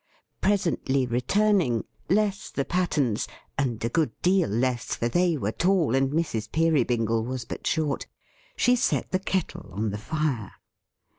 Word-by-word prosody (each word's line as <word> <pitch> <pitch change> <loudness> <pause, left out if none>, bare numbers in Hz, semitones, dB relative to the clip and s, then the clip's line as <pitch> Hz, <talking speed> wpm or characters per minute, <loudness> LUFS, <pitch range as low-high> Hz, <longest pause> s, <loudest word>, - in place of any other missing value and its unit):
Presently 170 -9 +1
returning, 130 - +2 0.3
less 205 +1 +1
the 140 - -2
pattens: 150 - 0 0.3
and 120 -5 -1
a - - 0
good 160 +4 +1
deal 185 0 +3
less, 120 +3 0
for 120 - -1
they 175 +5 +2
were 110 -5 -1
tall 175 -3 +2
and 135 0 +2
Mrs. 135 -9 -2
Peerybingle 120 -8 +2
was 125 0 -4
but - - -6
short: 155 -3 0 0.5
she 245 - +4
set 245 - 0
the 185 - +1
Kettle 185 - -3
on 105 +3 -2
the 105 - -4
fire. 140 -5 -2
140 Hz, 145 wpm, -26 LUFS, 115-180 Hz, 0.5 s, she